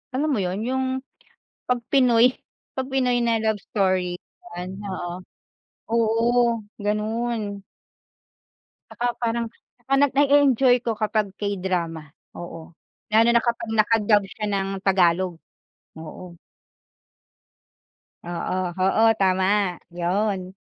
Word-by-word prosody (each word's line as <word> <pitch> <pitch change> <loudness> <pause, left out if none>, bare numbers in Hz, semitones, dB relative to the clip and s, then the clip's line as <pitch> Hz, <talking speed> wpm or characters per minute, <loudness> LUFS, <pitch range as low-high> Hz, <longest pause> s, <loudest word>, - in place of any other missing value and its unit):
alam 300 +3 0
mo 255 - +1
yun, 185 +4 -2
yung 260 +2 -1 0.8
'pag 250 0 +1
Pinoy 250 -2 +5 0.4
pag 265 0 -3
Pinoy 250 -2 +1
na 230 -1 +2
love 220 -1 0
story. 185 -3 +1 0.4
Yan 185 +2 -6
oo. 180 -2 -5 0.7
Oo 230 +1 +2 0.2
ganun. 210 0 -2 1.3
Tsaka 240 - -4 0.2
parang 235 0 0 0.3
tsaka 245 +2 -4 0.2
na-e-enjoy 275 -3 +5
ko 235 - +1
kapag 210 -2 0
K-Drama. 180 -5 -2 0.3
Oo, 165 -1 -9 0.4
lalo 225 +2 +5
na 235 - +4
kapag 235 -2 -2
naka-dub 215 -1 +3
siya 210 +3 -5
ng 195 -1 -1 0.2
Tagalog, 185 -2 +3 0.6
oo. 170 +2 -10 1.9
Oo 175 +1 -3
oo 220 +4 +4
tama, 190 0 +2
yon. 185 +2 -1
210 Hz, 100 wpm, -23 LUFS, 185-235 Hz, 1.9 s, Pinoy